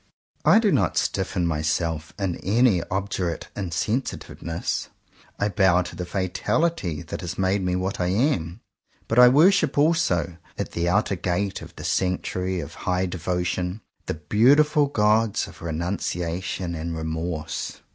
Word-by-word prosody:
I - - +6
do 220 -3 +3
not 95 - +1
stiffen 90 - 0
myself 80 0 -1
in 95 -4 -2
any 105 -2 +3
obdurate 95 -3 -2
in 95 -4 -3
sensitiveness. 90 -4 -3 0.5
I 100 - +2
bow 95 -3 +3
to 85 - -8
the 90 - -5
fatality 95 - -1
that 80 - -6
has 90 - -5
made 95 +1 +1
me 90 -1 0
what 95 +2 -2
I 90 - +1
am; 95 - 0 0.5
but 115 - +2
I 125 - +10
worship 160 +2 +4
also, 145 - +2 0.2
at - - -3
the 85 +1 0
outer 100 +1 +2
gate 95 +2 -2
of - - -11
the - - -9
sanctuary 90 0 -1
of - - -8 0.2
high 90 +1 +1
devotion, 90 +2 -2 0.3
the - - -2
beautiful 140 - +4
gods 110 -3 +2
of - - -13
renunciation 85 +1 -3
and 80 0 -4
remorse. 80 0 -4
90 Hz, 145 wpm, -24 LUFS, 85-105 Hz, 0.5 s, I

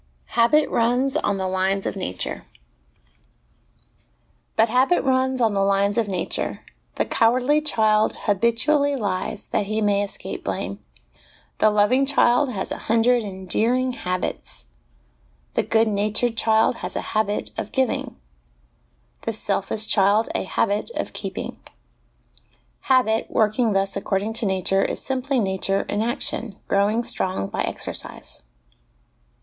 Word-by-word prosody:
Habit 265 +6 +4
runs 250 +4 +1
on 205 -10 0
the 190 -1 -2
Lines 190 +1 0
of - - -2
Nature. 90 - -4 2.1
But 225 - +4
habit 255 +9 +2
runs 260 -1 +1
on 225 -3 +2
the 195 - +1
lines 200 +1 +2
of 230 -3 +1
nature: 185 -3 -2 0.3
the - - 0
cowardly 255 +6 +2
child 220 -7 +2
habitu 230 +6 +2
ally 285 -1 +3
lies 205 -3 -2
that 200 - -1
he 215 +1 -1
may 205 -1 +2
escape 200 - -6
blame; - - -4 0.8
the 215 - +5
loving 210 +6 +3
child 270 -1 +3
has 190 -5 -4
a - - -4
hundred 230 +1 +3
endearing 220 +6 0
habits; 180 - -4 0.9
the - - +2
good 225 0 +2
natured 215 +3 0
child 220 -1 +2
has - - -6
a - - -1
habit 215 -1 0
of - - -5
giving; 260 -2 -1 1.1
the 225 - -2
selfish 210 +1 -1
child, 205 +2 +3
a - - -1
habit 205 - 0
of - - -4
keeping. - - -6 1.3
Habit, 235 -4 +3
working 220 +1 +2
thus 195 0 0
according 200 +3 -1
to 230 -1 0
nature, 190 0 +1
is - - -2
simply 265 0 0
nature 195 -1 0
in 205 - -2
action, 230 -2 -2
growing 205 +4 +2
strong 185 - -1
by - - -4
exercise. - - -5
220 Hz, 135 wpm, -23 LUFS, 200-245 Hz, 2.1 s, the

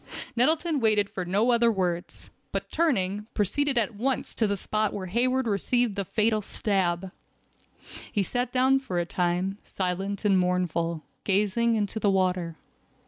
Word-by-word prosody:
Nettleton 310 +5 +2
waited 210 -3 +2
for 185 - -4
no 205 +7 +2
other 235 -1 +4
words, 180 -4 -2 0.2
but - - -3
turning, 210 - 0
proceeded 270 +7 +1
at 230 0 +1
once 255 +5 -1
to 220 - +1
the 200 0 -1
spot 215 +2 -1
where 195 -2 -4
Hayward 250 +7 +1
received 230 +2 +1
the 200 - -1
fatal 215 +3 +1
stab. 190 -3 -1 1.0
He 205 - +1
sat 245 +4 -1
down 260 +1 +3
for 225 -10 -4
a 175 - +1
time, 180 +3 -1
silent 195 +3 -3
and 195 -2 +4
mournful, 170 -3 0 0.2
gazing 210 +4 +2
into 210 0 -1
the 205 - +2
water. 180 -3 +1
205 Hz, 150 wpm, -27 LUFS, 185-235 Hz, 1.0 s, other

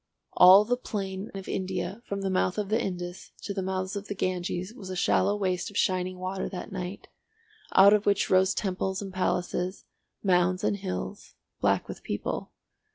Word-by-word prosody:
All 190 +3 +8
the 245 +2 +1
plain 195 -4 -4
of 195 -1 -7
India 185 +2 -3
from 200 0 -3
the 195 -1 -1
mouth 185 0 +1
of 205 -2 -2
the 220 +2 +2
Indus 175 -1 -5
to 200 - -3
the 195 - -2
mouths 185 +1 -2
of 200 0 -5
the 205 - -4
Ganges 185 +1 -2
was 205 -7 -9
a 185 - -4
shallow 190 +2 +2
waste 185 -3 -1
of 205 - -7
shining 185 -1 +1
water 185 +1 -3
that 185 - -7
night, 185 0 -6 0.7
out 200 +2 +8
of 210 -1 +2
which 200 -1 +3
rose 190 +1 +4
temples 190 0 -2
and 195 -1 -7
palaces, 180 0 -1 0.4
mounds 185 -1 +2
and 200 - +1
hills, 195 +1 -5 0.2
black - - +2
with - - -8
people. - - -3
190 Hz, 180 wpm, -28 LUFS, 185-200 Hz, 0.7 s, All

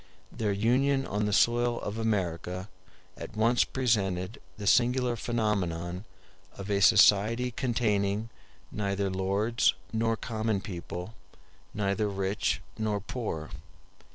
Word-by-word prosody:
Their 110 -3 -1
union 130 +7 +2
on 105 +1 -1
the - - -1
soil 120 +2 +3
of 105 +2 -4
America 95 -3 -2 0.5
at 110 - -9
once 115 +2 +4
presented 100 -6 -1 0.2
the 105 - -6
singular 125 +2 +3
phenomenon 95 -6 -2 0.5
of 100 +1 -5
a 100 -1 +1
society 110 +5 +5
containing 110 -3 0 0.4
neither 100 -2 -1
lords 100 +5 +1 0.2
nor 115 0 +1
common 110 -3 -1
people, 90 +1 -7 0.6
neither 105 0 0
rich 100 0 -1 0.2
nor 105 -2 0
poor. 100 -8 -5
105 Hz, 110 wpm, -29 LUFS, 100-115 Hz, 0.6 s, society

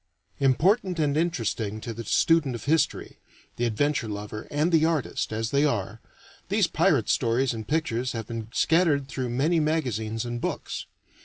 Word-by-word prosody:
Important 180 - +2
and 145 -3 +1
interesting 115 -10 -1
to 115 - -5
the 115 +1 -6
student 150 +3 +2
of 120 - -7
history, 160 +3 0 0.4
the 120 - 0
adventure 120 +2 0
lover, 105 +1 -6
and 150 +4 +1
the 160 -2 +4
artist, 160 -8 0
as 110 +1 -2
they 140 0 +3
are, 115 -10 -1 0.5
these - - +3
Pirate - - +2
stories 120 +2 +1
and 110 -1 -6
pictures 130 -6 -1
have 115 -2 -4
been 115 -1 -6
scattered 155 -1 +2
through 130 -2 -3
many 150 +8 +2
magazines 120 -8 -1
and 120 0 -4
books. - - -4
130 Hz, 160 wpm, -26 LUFS, 115-155 Hz, 0.5 s, the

